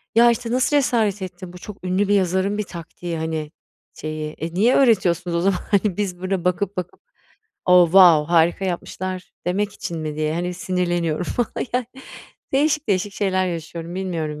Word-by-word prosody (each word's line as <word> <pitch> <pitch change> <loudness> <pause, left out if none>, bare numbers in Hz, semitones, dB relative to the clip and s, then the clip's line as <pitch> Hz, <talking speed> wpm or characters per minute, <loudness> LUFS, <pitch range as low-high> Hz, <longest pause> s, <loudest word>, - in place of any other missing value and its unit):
"Ya, 235 +1 +7
işte 235 0 -3
nasıl 260 +4 +2
cesaret 220 -7 +1
ettin? 180 -1 -7
Bu - - -9
çok 200 +1 -11
ünlü 185 +2 +1
bir 205 - +2
yazarın 190 +1 +1
bir 210 - -1
taktiği, 170 -1 -7
hani, 160 -1 -3 0.4
şeyi." 155 0 -5
E, 165 +2 -6
niye 225 +7 +3
öğretiyorsunuz 180 -8 +3
o - - 0
zaman, 190 -1 +2
hani, 200 -2 +2
biz 190 -4 -2
burada 185 -1 -2
bakıp 180 +2 0
bakıp 180 -1 -5 0.6
"Oh, 180 -1 +7
wow 170 -3 +6
harika 170 +3 +3
yapmışlar." 185 +1 -4
demek 200 +3 0
için 170 -5 -5
mi 155 -1 -4
diye, 155 +1 -1
hani, 175 +1 -2
sinirleniyorum 175 -2 -1
falan, 240 +5 -2
yani, 250 -1 0 0.7
değişik 300 +1 +1
değişik 195 +1 0
şeyler 185 -2 0
yaşıyorum. 170 0 -5
Bilmiyorum 165 -5 -3
180 Hz, 170 wpm, -22 LUFS, 170-200 Hz, 0.7 s, Ya